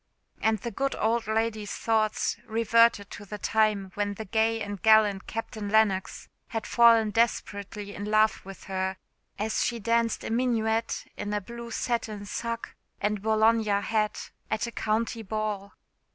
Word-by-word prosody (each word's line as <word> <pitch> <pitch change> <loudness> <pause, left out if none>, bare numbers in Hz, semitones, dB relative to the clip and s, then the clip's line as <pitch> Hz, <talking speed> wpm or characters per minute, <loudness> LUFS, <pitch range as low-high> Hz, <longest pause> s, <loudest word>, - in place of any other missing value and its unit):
And 220 0 +2
the 235 +4 -5
good 275 +6 -1
old 225 +1 0
lady's 220 -1 -1
thoughts 220 -1 0
reverted 230 -2 +3
to 205 - -8
the 210 +1 -7
time 205 -2 +1
when 205 0 -2
the 220 - -6
gay 225 +2 +1
and 205 -2 -5
gallant 215 -3 +4
Captain 215 -2 -5
Lennox 205 -3 +1 0.2
had 225 - -4
fallen 230 -2 +5
desperately 205 -2 -1
in 205 - -6
love 215 +1 +2
with 195 -2 -10
her, 190 0 -2 0.4
as 215 +2 0
she 240 - -1
danced 230 +1 0
a - - -4
minuet 230 -2 0
in 205 0 -4
a - - +1
blue 235 +3 -9
satin 225 -3 -2
sacque 230 +3 -4 0.2
and 210 0 -1
Bologna 220 +1 +3
hat 215 0 -1 0.2
at 220 +1 0
a 235 - -5
county 225 +1 -1
ball. 210 -1 -3
220 Hz, 150 wpm, -27 LUFS, 205-230 Hz, 0.4 s, fallen